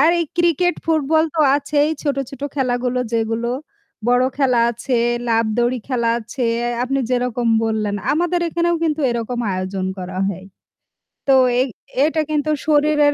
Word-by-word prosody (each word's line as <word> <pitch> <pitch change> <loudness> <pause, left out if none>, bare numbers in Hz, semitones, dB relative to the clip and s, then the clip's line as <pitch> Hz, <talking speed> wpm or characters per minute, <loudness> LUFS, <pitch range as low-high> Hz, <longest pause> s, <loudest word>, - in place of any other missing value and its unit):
আর 315 +4 +6
এই 335 - -1
cricket, 345 +1 +2
football 315 0 +2
তো 320 - +1 0.2
আছেই 290 +1 +1
ছোটো, 280 -2 0
ছোটো 275 +1 -5
খেলাগুলো 250 -2 0 0.2
যেগুলো 225 +1 -1 0.6
বড় 245 +1 +4
খেলা 255 -4 +3
আছে 240 +2 -1 0.3
লাফ 230 -1 +2
দৌড়ি 240 +1 +1
খেলা 235 -3 +1
আছে 235 +2 -3 0.4
আপনি 270 +2 -1
যেরকম 245 -1 0 0.2
বললেন 215 -2 -1 0.2
আমাদের 345 +2 +1
এখানেও 340 +1 +1
কিন্তু 310 -1 0
এরকম 235 +1 -3
আয়োজন 185 0 -3
করা 185 0 -5
হয়। 185 -1 -5 0.9
তো - - +7 0.3
এই 260 - +2 0.4
এটা 315 0 +1
কিন্তু 305 0 0 0.2
শরীরের 295 -1 +4
255 Hz, 145 wpm, -20 LUFS, 235-305 Hz, 0.9 s, তো